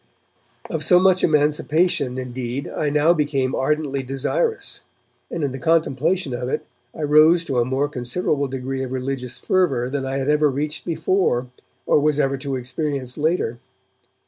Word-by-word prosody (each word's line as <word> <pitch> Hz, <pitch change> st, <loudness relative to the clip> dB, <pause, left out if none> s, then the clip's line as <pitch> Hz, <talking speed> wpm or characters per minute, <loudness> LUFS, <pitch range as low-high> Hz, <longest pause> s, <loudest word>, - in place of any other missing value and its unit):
Of 160 Hz, -1 st, -3 dB
so 180 Hz, +2 st, +5 dB
much 185 Hz, 0 st, +3 dB
emancipation, 150 Hz, -2 st, +2 dB
indeed, 125 Hz, +1 st, -4 dB
I 150 Hz, -, -2 dB
now 150 Hz, +3 st, +4 dB
became 140 Hz, -4 st, 0 dB
ardently 140 Hz, 0 st, 0 dB
desirous, 135 Hz, -, -2 dB, 0.5 s
and 170 Hz, -, -3 dB
in 140 Hz, -, 0 dB
the 135 Hz, -, -6 dB
contemplation 160 Hz, +1 st, +1 dB
of 125 Hz, +1 st, -3 dB
it -, -, -2 dB, 0.3 s
I 155 Hz, -, -5 dB
rose 155 Hz, +3 st, +5 dB
to 135 Hz, -5 st, 0 dB
a 120 Hz, -, +2 dB
more 135 Hz, +3 st, 0 dB
considerable 140 Hz, +2 st, -1 dB
degree 135 Hz, 0 st, -4 dB
of 130 Hz, -1 st, -4 dB
religious 130 Hz, -1 st, -4 dB
fervour 135 Hz, -10 st, +1 dB
than 140 Hz, -1 st, -2 dB
I 135 Hz, 0 st, -2 dB
had 135 Hz, 0 st, -2 dB
ever 150 Hz, 0 st, +3 dB
reached 150 Hz, +3 st, -3 dB
before 160 Hz, -6 st, 0 dB, 0.4 s
or -, -, +4 dB
was 150 Hz, 0 st, +1 dB
ever 135 Hz, -1 st, +1 dB
to 140 Hz, -1 st, -3 dB
experience 130 Hz, 0 st, -3 dB
later. 150 Hz, -7 st, 0 dB
140 Hz, 160 wpm, -22 LUFS, 130-155 Hz, 0.5 s, so